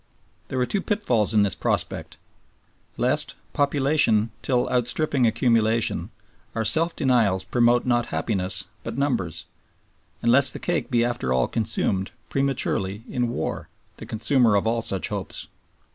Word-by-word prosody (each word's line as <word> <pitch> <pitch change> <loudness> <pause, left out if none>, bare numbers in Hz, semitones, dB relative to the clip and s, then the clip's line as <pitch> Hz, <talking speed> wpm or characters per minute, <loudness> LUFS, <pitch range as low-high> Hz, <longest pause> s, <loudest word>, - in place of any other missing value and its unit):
There 130 - -4
were 125 - +2
two 195 +9 -1
pitfalls 125 - 0
in 105 -2 +4
this 100 -4 +1
prospect: - - -2 0.8
lest, 145 +5 0 0.2
population 140 -6 +2
still 125 -2 +1
outstripping 125 +1 +1
accumulation, 115 -1 +1 0.5
our 110 - -1
self 165 +7 +2
denials 110 -8 +2
promote 120 0 +2
not 120 -1 +1
happiness 95 -3 -1 0.2
but - - -6
numbers; 110 - -1 0.8
and 120 - +4
lest 135 +1 +6
the - - -6
cake 175 -2 -2
be 120 -3 +2
after 120 - -2
all 65 -1 +2
consumed, 105 -4 -1 0.2
prematurely, 115 -7 -1
in 120 -1 -1
war, - - -4 0.3
the - - -9
consumer 115 0 +2
of 100 - +1
all 115 +1 +1
such 95 -4 -1
hopes. - - -5
120 Hz, 140 wpm, -24 LUFS, 105-135 Hz, 0.8 s, lest